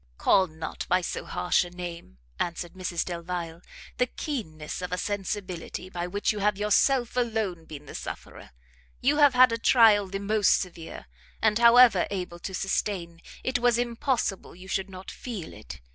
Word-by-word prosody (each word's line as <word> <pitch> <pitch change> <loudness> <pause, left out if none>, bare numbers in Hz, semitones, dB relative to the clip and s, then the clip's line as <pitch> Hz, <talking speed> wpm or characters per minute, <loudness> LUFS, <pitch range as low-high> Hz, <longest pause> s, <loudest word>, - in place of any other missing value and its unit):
"Call 190 -2 +4
not 160 0 -6
by 180 +1 +3
so - - -4
harsh 180 - +1
a 175 - -8
name," 175 - -8 0.2
answered 170 0 -3
Mrs 180 -2 -2
Delvile, 170 -1 -5 0.4
"the 250 - +2
keenness 180 - -5
of 180 -1 -5
a 180 - -1
sensibility 190 -2 -4
by 175 -1 -3
which 205 +3 0
you 210 - -4
have 205 0 +1
yourself 235 +5 +2
alone 220 -9 -1
been 150 -2 -10
the - - -10
sufferer. - - -8 0.5
You 285 +3 +2
have 290 -4 +6
had 255 -1 +7
a 230 - -1
trial 220 -4 +5
the 195 +1 -4
most 205 +1 +3
severe, 170 -3 -7 0.3
and 215 0 +2
however 235 -5 +7
able 180 -3 -5
to 190 +2 -5
sustain, 180 -3 -2 0.2
it 255 -1 0
was 240 -1 +3
impossible 240 -5 -1
you 185 +1 -12
should 190 0 -2
not 185 0 -9
feel 215 -10 -7
it. - - -10
190 Hz, 170 wpm, -27 LUFS, 175-230 Hz, 0.5 s, had